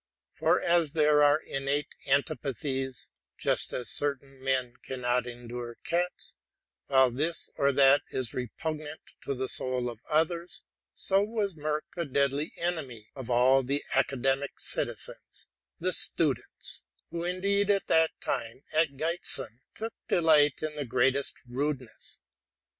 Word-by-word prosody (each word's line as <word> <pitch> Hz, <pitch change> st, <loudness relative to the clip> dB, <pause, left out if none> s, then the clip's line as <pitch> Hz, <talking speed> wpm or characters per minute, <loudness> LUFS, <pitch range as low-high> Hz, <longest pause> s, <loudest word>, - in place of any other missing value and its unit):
For -, -, +2 dB
as 170 Hz, -4 st, +2 dB
there 150 Hz, -2 st, +4 dB
are 145 Hz, +1 st, +5 dB
innate 140 Hz, 0 st, -2 dB
antipathies, 135 Hz, -2 st, -1 dB
— -, -, -61 dB
just -, -, +3 dB
as 125 Hz, -, -1 dB
certain 135 Hz, -2 st, -1 dB
men 130 Hz, -2 st, 0 dB
cannot 125 Hz, -1 st, -1 dB
endure 120 Hz, 0 st, -7 dB
cats, 175 Hz, +1 st, -2 dB, 0.5 s
while 130 Hz, -2 st, +5 dB
this 155 Hz, +7 st, -1 dB
or 140 Hz, 0 st, +3 dB
that 140 Hz, +1 st, +6 dB
is 130 Hz, -4 st, -2 dB
repugnant 155 Hz, +5 st, -5 dB, 0.2 s
to 140 Hz, -, -3 dB
the 130 Hz, +1 st, -2 dB
soul 125 Hz, -2 st, +3 dB
of 115 Hz, -1 st, -13 dB
others, 170 Hz, +3 st, 0 dB, 0.3 s
—so 195 Hz, 0 st, +3 dB
was 210 Hz, -2 st, -2 dB
Merck 155 Hz, -1 st, -2 dB
a 170 Hz, -1 st, -2 dB
deadly 140 Hz, +2 st, 0 dB
enemy 140 Hz, -11 st, -4 dB
to 130 Hz, -3 st, -6 dB
all 130 Hz, +3 st, +5 dB
the 140 Hz, +3 st, -1 dB
academical 135 Hz, +1 st, 0 dB
citizens -, -, -2 dB, 0.3 s
(the -, -, -1 dB
students), -, -, +1 dB, 0.3 s
who 170 Hz, 0 st, -3 dB
indeed 200 Hz, +3 st, +1 dB
at 200 Hz, -1 st, +2 dB
that 160 Hz, 0 st, +4 dB
time, 115 Hz, +5 st, -3 dB
at 155 Hz, -3 st, +2 dB
Giessen, 135 Hz, -6 st, +1 dB, 0.2 s
took 225 Hz, +1 st, -4 dB
delight 155 Hz, -4 st, +4 dB
in 155 Hz, -1 st, -2 dB
the 150 Hz, -, -2 dB
greatest 135 Hz, +3 st, +1 dB
rudeness. 130 Hz, -1 st, -4 dB
140 Hz, 135 wpm, -29 LUFS, 130-160 Hz, 0.5 s, that